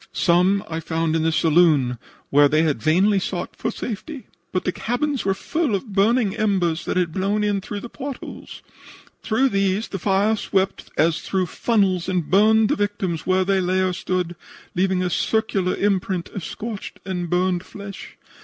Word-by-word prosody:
Some 180 +3 +3
I 160 0 -3
found 165 0 -1
in 165 - +1
the 165 +1 +2
saloon 155 -7 +3 0.3
where 145 +1 +6
they 155 +2 +2
had 150 -8 0
vainly 190 - +3
sought 180 -1 -4
for - - -2
safety, 245 +5 -6 0.3
but 185 - -1
the 185 - +1
cabins 250 +6 -2
were 195 -1 +1
full 305 - -1
of 200 +2 -5
burning 210 +1 +2
embers 185 -7 0
that - - -1
had 175 -3 +1
blown 200 +4 0
in 205 -1 0
through 205 +1 -6
the - - -7
port 275 0 -6
holes. - - -10 0.6
Through 255 +4 +2
these 195 0 0
the 195 - -4
fire 200 +4 +2
swept 195 -2 -1
as 160 +1 +3
through 190 -1 -1
funnels 190 -2 +1
and 180 -4 -1
burned 215 +3 +5
the - - +2
victims 195 -5 -2
where 185 0 +3
they 195 0 +2
lay 185 +1 +1
or 185 -1 +1
stood, 180 -1 -2 0.4
leaving 185 0 +1
a 180 - 0
circular 195 -2 0
imprint 195 -2 0
of 195 - -6
scorched 215 +2 -6
and 180 -2 -3
burned 180 0 +1
flesh. 200 -1 -10
190 Hz, 180 wpm, -22 LUFS, 175-205 Hz, 0.6 s, where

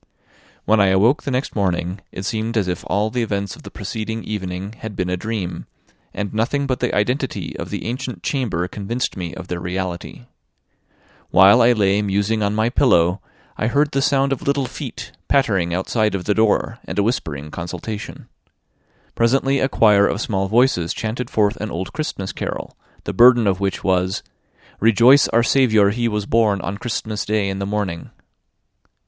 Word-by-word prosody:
When 110 0 +3
I 100 - +5
awoke 105 +10 +3
the - - -4
next 130 +1 -2
morning, 95 -1 -1
it 95 - -6
seemed 115 +1 -2
as 100 -4 +1
if 90 -2 -3
all 105 +2 0
the 125 - -1
events 100 -4 -2
of - - -15
the - - -10
preceding 110 +1 -5
evening 95 -1 -5
had 110 -3 -7
been 90 -1 -2
a - - +1
dream, 100 -2 -4 0.4
and 105 0 -4
nothing 130 +6 0
but 130 -2 -1
the - - 0
identity 125 +6 -1
of - - -5
the - - -5
ancient 120 -5 -5
chamber 115 - -1
convinced 110 +6 -3
me 90 -3 -5
of 90 -1 -8
their 90 -1 -4
reality. 90 -8 -5 1.0
While 100 +6 +7
I 120 +1 +6
lay 100 -2 +2
musing 100 +2 0
on 100 0 0
my 110 +2 +1
pillow, 90 -9 +3 0.4
I 110 - +1
heard 145 +4 +2
the 135 - 0
sound 135 0 +2
of 135 - -5
little 140 -1 0
feet - - -7 0.2
pattering 100 -11 +2
outside 105 +4 0
of 90 - -4
the 105 - +2
door, 110 0 +1
and 95 - -6
a 100 - +3
whispering 75 - -3
consultation. 90 +5 -6 0.9
Presently 135 +3 +2
a 135 - +1
choir 105 -4 +4
of 100 - -2
small 95 -4 -1
voices 110 -6 +2
chanted 115 +2 -3
forth 105 +1 +1
an 110 - -4
old 90 +1 -5
Christmas 145 -10 -4
carol, - - -5 0.3
the - - -4
burden 120 -1 +6
of 95 -2 +1
which 100 -1 -2
was: 95 0 0 0.6
"Rejoice, 120 +6 +6
our 115 +1 +2
Saviour 110 -5 +4
he 120 +2 0
was 105 -2 -2
born 110 -3 +2
On 100 +2 -4
Christmas 110 -2 -3
Day 105 -2 0
in 95 0 -4
the 100 - -3
morning." 100 -5 -3
105 Hz, 180 wpm, -20 LUFS, 95-120 Hz, 1.0 s, While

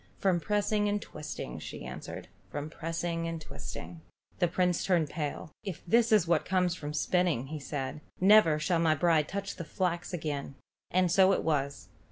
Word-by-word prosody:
"From 185 -3 +2
pressing 205 +4 +1
and 205 0 +1
twisting," 150 - -6
she - - -7
answered. - - -7 0.2
"From 145 +1 -5
pressing 165 +1 -2
and 165 -1 -3
twisting." 160 +2 -8 0.4
The 175 - +4
Prince 180 0 +1
turned 170 -6 +2
pale. 155 +2 -4
"If 195 -6 -6
this 230 +5 +4
is 210 -6 +5
what 170 -2 +3
comes 180 -1 0
of 150 0 -4
spinning," 165 -5 +1
said 140 0 -4 0.2
he, 185 - 0
"never 200 -7 +7
shall 165 +2 +1
my 160 -2 +3
bride 155 -1 +3
touch 200 0 -4
the 170 - -4
flax 175 +2 -2
again." 150 -5 -3 0.3
And 185 -1 +2
so 190 +1 +6
it - - 0
was. 140 -3 -1
170 Hz, 175 wpm, -30 LUFS, 155-185 Hz, 0.4 s, never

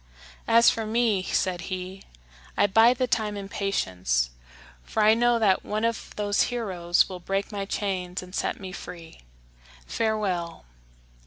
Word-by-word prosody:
"As 230 +1 +6
for 225 - -3
me," 220 -2 +1
said 185 -1 -1
he, 185 +1 -5 0.6
"I - - +5
bide 225 +5 +5
the 255 - +1
time 215 -4 -1
in 200 -1 -6
patience, 90 - -1 0.5
for 220 - -1
I 215 +1 +7
know 240 +1 +3
that 205 -4 +2
one 215 +2 -2
of 230 0 -2
those 205 -1 +1
heroes 185 -8 +1
will 185 -2 -7
break 195 +4 -2
my 200 -1 -3
chains 185 -3 -3
and 180 0 -13
set - - -2
me 190 -2 -7
free. 170 -3 -10 0.7
Farewell!" 190 - -2
200 Hz, 150 wpm, -26 LUFS, 180-220 Hz, 0.7 s, I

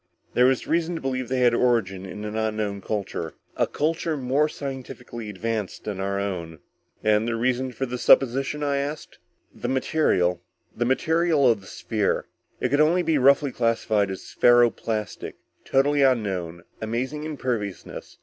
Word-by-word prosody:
"There 125 +1 +5
was 130 -1 +1
reason 170 +1 0
to 165 - -5
believe 130 -2 -2
they 130 0 0
had 120 -1 +5
origin 110 -6 +1
in 105 +3 -7
an 105 0 -5
unknown 110 -2 -2
culture. 105 0 -4 0.2
A - - +1
culture 160 +1 -1
more 140 +4 +1
scientifically 130 -5 -7
advanced 105 0 -3
than 105 -3 -4
our 100 +1 -1
own." 85 -5 -4 0.5
"And 110 +1 +3
the 120 - 0
reasons 125 +2 -1
for 135 - -1
this 125 -1 -5
supposition?" 135 +3 +3
I 140 -1 +1
asked. 145 +2 -5 0.3
"The - - -5
material... 95 - +1 0.3
the 120 - 0
material 160 +2 +2
of 115 -4 +3
the 95 - -15
sphere. 105 -4 -1 0.3
It - - 0
could 145 +1 +3
only 170 +4 +3
be 160 -3 +2
roughly 140 +1 +4
classified 115 -4 +1
as 95 - -7
ferro 120 -1 +5
plastic. 110 -2 -4 0.3
Totally 145 +2 +2
unknown, 95 -10 0 0.2
amazing 125 +7 -3
imperviousness. 125 - -4
120 Hz, 160 wpm, -25 LUFS, 105-140 Hz, 0.5 s, There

